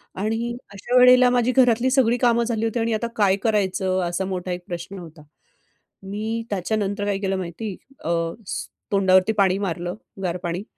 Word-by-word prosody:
आणि 225 +4 -2 0.2
अशा 240 +6 -1
वेळेला 250 0 +7
माझी 245 0 +2
घरातली 245 -1 +3
सगळी 245 -2 +3
कामं 235 -1 +3
झाली 225 -1 -1
होती 225 +1 -1
आणि 225 0 0
आता 230 +2 -1
काय 195 -3 +3
करायचं? 190 -3 +1
असा 185 +2 -2
मोठा 185 -1 -4
एक 180 0 -4
प्रश्न 175 +2 -6
होता. 165 -2 -12 0.8
मी 215 +4 -3
त्याच्यानंतर 205 +1 -1
काय 200 -1 0
केलं 195 -1 -1
माहिती? 185 +3 -5 0.3
अ, 165 - -3 0.8
तोंडावरती 190 0 +4
पाणी 190 -1 +3
मारलं, 175 +1 -3 0.3
गार 180 0 -1
पाणी. 175 +3 -3
205 Hz, 160 wpm, -23 LUFS, 185-230 Hz, 0.8 s, वेळेला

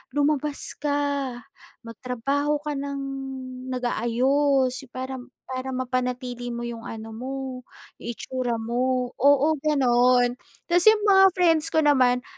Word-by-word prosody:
"Lumabas 290 0 -1
ka, 285 -3 -1 0.5
magtrabaho 255 +6 -2
ka 300 - -3
ng 280 0 -4 0.7
nag-aayos 255 +3 +1 0.2
parang 260 -1 -5 0.2
para 260 0 -5
mapanatili 250 -1 -3
mo 235 0 -4
yung 235 -1 -6
ano 225 0 -7
mo, 255 +4 -6 0.7
yung - - -8
itsura 255 -2 -2
mo." 250 +2 -1
Oo, 285 +2 +4
ganun. 250 -4 +3 0.3
Kasi 355 +6 +6
yung 420 - -5
mga 385 -1 +6
friends 330 -3 +3
ko 315 -1 +2
naman 255 -4 +3
260 Hz, 115 wpm, -25 LUFS, 245-285 Hz, 0.7 s, Kasi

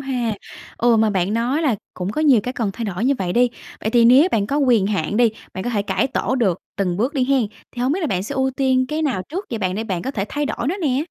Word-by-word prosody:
ha. 250 -5 -2 0.4
Ừ, 235 -1 +4
mà 220 -1 +3
bạn 190 +1 0
nói 250 +7 0
là 265 -8 +2 0.2
cũng 180 +1 -3
có 305 - -2
nhiều 280 -7 +5
cái 250 - -3
cần 230 -5 -2
thay 230 - -5
đổi 200 +1 -3
như 275 +2 +3
vậy 180 -2 -2
đi. 245 +3 +4 0.3
Vậy 220 - -1
thì 235 0 +4
nếu 260 +9 +7
bạn 205 -3 +1
có 280 - -1
quyền 245 -8 +3
hạn 200 -2 -1
đi, 235 -1 +4 0.2
bạn 190 - -4
có 245 - -1
thể 210 -4 0
cải 205 - 0
tổ 260 -1 -1
được 200 -9 +1 0.2
từng 180 -3 -1
bước 245 - -1
đi 265 -3 +2
hén, 270 -5 +3 0.3
thì 245 - -4
hổng 260 +3 +2
biết 370 - -1
là 330 - 0
bạn 185 -9 -1
sẽ 205 - -5
ưu 265 0 +1
tiên 260 -1 +1
cái 310 +1 -2
nào 260 -11 0
trước 370 +7 -4
vậy 230 - -2
bạn, 185 -3 -1
để 220 +3 -3
bạn 185 -6 -3
có 265 - -3
thể 205 -8 -2
thay 295 0 -2
đổi 250 -2 -2
nó 355 - -1
nè? 280 -1 +1
240 Hz, 295 wpm, -21 LUFS, 205-270 Hz, 0.4 s, nếu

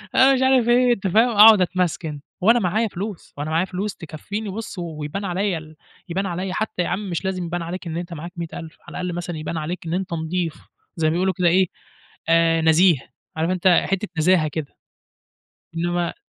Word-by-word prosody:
أنا 265 +1 +6
مش 260 - +1
عارِف 260 -3 +4
إيه، 245 0 +5
أنت 195 -4 -3
فاهم؟ 225 +6 +4
أقعد 215 -2 +8
أتمسكن 175 -5 -1 0.2
وأنا 230 +6 +5
معايا 215 +3 +1
فلوس، 200 -1 -7
وأنا 145 +2 -3
معايا 165 +3 +1
فلوس 195 +2 -4
تكفّيني 195 +6 -6
بُص، 205 -1 -6
ويبان 165 +3 -5
عليّا 190 0 -1
ال 155 0 -11 0.3
يبان 190 +4 -1
عليّا 185 +1 -3
حتّى 215 -2 -2
يا - - -3
عم 200 +1 -3
مش 175 +2 -3
لازم 185 -2 -2
يبان 175 +1 -3
عليك 175 +2 -6
إن 165 0 -4
أنت 175 0 -5
معاك 170 +2 -7
100.000 165 -1 -7
على - - -6
الأقَل 180 -1 -3
مثلًا 175 -1 -4
يبان 155 +2 -4
عليك 165 +3 -4
إن 165 - -3
أنت 185 -1 -2
نضيف. 165 0 -2 0.4
زي 160 -2 +1
ما 155 - +2
بيقولوا 185 +2 +1
كده 180 -2 +2
إيه 185 +2 +4 0.6
آآ 165 0 +4
نزيه. 160 0 +5 0.4
عارف 160 +2 0
أنت 185 0 +1 0.2
حتّة 195 +2 -1
نزاهة 165 -1 +4
كده. 150 -1 -6 1.0
إنّما 175 +1 -1
180 Hz, 195 wpm, -22 LUFS, 165-195 Hz, 1.0 s, أقعد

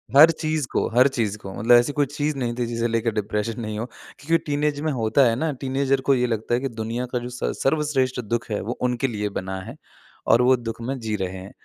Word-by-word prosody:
हर 155 +4 +9
चीज़ 155 -4 -2
को - - +1
हर 125 +4 +5
चीज़ 115 -6 -1
को, 95 -2 -9
मतलब 120 +3 +4
ऐसी 120 +4 +4
कोई 145 -1 +2
चीज़ 145 +1 -2
नहीं 120 -2 -1
थी 120 -1 -1
जिसे 115 0 -1
लेके 115 0 0
डिप्रेशन 105 +2 -2
नहीं 110 -1 -4
हो 115 - -2 0.3
क्योंकि 165 +4 +2
टीनेज 145 0 0
में 155 -1 0
होता 125 +2 +2
है 115 - 0
ना 155 +4 -1
टीनेजर 135 0 +1
को - - +7
ये 125 0 +1
लगता 115 0 -2
है 120 - +3
कि 135 - -2
दुनिया 115 +2 -3
का 125 - +1
जो 120 +1 -6
स 125 - -3
सर्वश्रेष्ठ 135 -3 +1
दुःख 115 +2 -3
है, 105 - 0
वो 110 - -4
उनके 125 +1 +1
लिए 105 -3 -2
बना 95 0 -5
है 115 +7 -9 0.5
और 115 +2 +5
वो 130 +1 +5
दुःख 115 -1 -6
में 135 +3 -3
जी 110 -2 -2
रहे 95 -1 -3
हैं। 95 +2 -9
120 Hz, 245 wpm, -23 LUFS, 110-135 Hz, 0.5 s, हर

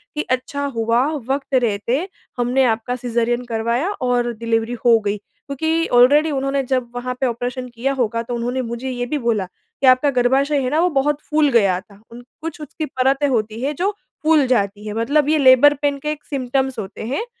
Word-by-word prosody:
कि 300 - 0
अच्छा 260 +3 -2
हुआ 230 +1 +2 0.3
वक़्त 275 0 -2
रहते 245 - +1 0.3
हमने 245 +2 +2
आपका 230 +1 0
सिज़ेरियन 240 0 -1
करवाया 235 - -1
और 245 -1 +1
डिलिवरी 230 +1 -1
हो 235 -1 +7
गई, 205 -1 -2
क्योंकि 320 +9 -3
ऑलरेडी 290 +6 +5
उन्होंने 275 0 -1
जब 255 -2 -1
वहाँ 250 +1 -3
पे - - +3
ऑपरेशन 245 +2 -4
किया 245 +3 -2
होगा 230 -1 0
तो 240 +1 -4
उन्होंने 245 +2 -2
मुझे 240 +3 -4
ये 245 -1 -3
भी 295 +5 -2
बोला 230 -7 0
कि 190 +8 -5
आपका 255 +3 +5
गर्भाशय 275 +4 +2
है 255 - -1
ना, 300 +4 +1
वो 355 +2 +3
बहुत 295 +2 0
फूल 300 -1 +3
गया 200 -7 +3
था। 200 0 -20
उन 240 +1 -11 0.2
कुछ 325 -1 -6
उसकी 300 +2 -5
परतें 270 +1 +1
होती 225 -3 -1
है 280 +3 -1
जो 370 +7 0 0.3
फूल 310 -2 +4
जाती 205 -4 0
है, 210 - -4
मतलब 280 +7 +1
ये 310 - +3
लेबर 270 +1 +6
पेन 285 -1 +1
के 300 +2 -2
एक 300 -1 -7
सिम्पटम्स 265 -2 -2
होते 205 +1 -7
हैं। 440 - -2
255 Hz, 195 wpm, -20 LUFS, 235-280 Hz, 0.3 s, हो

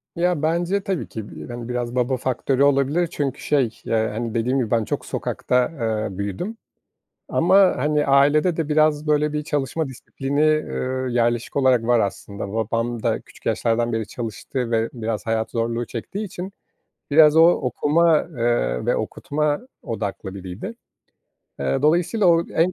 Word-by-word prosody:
Ya, 175 -2 +1
bence 175 +5 0
tabii 190 -4 -2
ki, 110 -2 -7
bi - - -9
hani, 120 0 -7
biraz 120 0 -3
baba 125 +1 +1
faktörü 130 +2 0
olabilir 140 +5 +2
çünkü 140 -4 -3
şey, 130 -6 0
ya, 110 -1 0
hani, 115 0 -3
dediğim 120 +3 0
gibi 115 -4 -2
ben 115 -2 +2
çok - - -3
sokakta, 125 0 0
eee, 110 -4 -2
büyüdüm 100 - -4 0.7
ama, 190 +3 +4
hani, 150 0 +1
ailede 145 +5 +4
de 160 -3 -2
biraz 155 0 +2
böyle 150 0 +2
bir 150 0 -2
çalışma 145 0 -1
disiplini, 135 +3 -3 0.2
ııı, 130 -3 -3
yerleşik 120 -1 0
olarak 130 -4 +3
var 120 0 +3
aslında. 100 0 -3
Babam 115 +1 -1
da - - 0
küçük - - -19
yaşlardan 115 0 +1
beri 110 -1 -2
çalıştı 120 +2 -4
ve 115 0 +1
biraz 110 -4 -3
hayat 110 0 -1
zorluğu 115 +1 -1
çektiği 195 - -5
için 185 0 -7 0.6
biraz 150 0 +7
o 160 - +8
okuma, 160 +2 +3
eee, 115 - -1
ve - - +2
okutma 150 0 -1 0.2
odaklı 100 -3 -4
biriydi. 95 - -7 0.8
Eee, 135 - -1
dolayısıyla 175 +7 +2
o 170 -1 +4
en 170 +3 +1
130 Hz, 155 wpm, -22 LUFS, 115-155 Hz, 0.8 s, o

